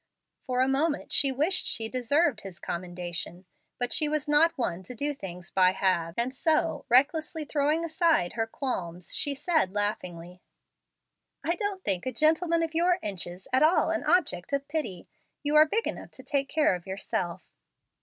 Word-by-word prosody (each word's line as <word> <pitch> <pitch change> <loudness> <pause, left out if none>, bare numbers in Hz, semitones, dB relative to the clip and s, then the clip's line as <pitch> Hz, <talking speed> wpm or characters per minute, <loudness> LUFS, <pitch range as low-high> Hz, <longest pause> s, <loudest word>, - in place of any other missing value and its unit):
For 255 0 +1
a 260 - +3
moment 290 +3 0
she 275 -1 +4
wished 305 +8 0
she 225 - -1
deserved 255 +1 +1
his 190 -3 -9
commendation. 175 0 -5 0.3
But 245 -1 -2
she 305 -2 +2
was 300 -1 -1
not 300 +3 +4
one 185 -8 -1
to 220 +7 -10
do 290 +5 -1
things 180 -8 -9
by 185 -1 +4
halves, 175 -4 0
and 240 +2 0
so, 300 0 +1
recklessly 305 +5 +2
throwing 300 +3 +1
aside 320 - +2
her 225 0 -1
qualms, 180 - -4
she 285 -1 -2
said 295 - +1
laughingly, 180 -4 -3 1.0
"I 335 - +1
don't 390 0 -3
think 190 +5 0
a - - 0
gentleman 325 +5 +2
of 325 0 -3
your 345 +2 +3
inches 185 -2 -6
at 260 - +4
all 310 0 +4
an 330 - -1
object 290 - +1
of 280 0 -1
pity. 290 - -4 0.4
You 295 +1 0
are 305 +1 +8
big 450 +8 0
enough - - -5
to - - -12
take 275 -1 -1
care 305 -9 +3
of 180 0 -6
yourself." 185 -2 -3
270 Hz, 175 wpm, -28 LUFS, 185-310 Hz, 1.0 s, are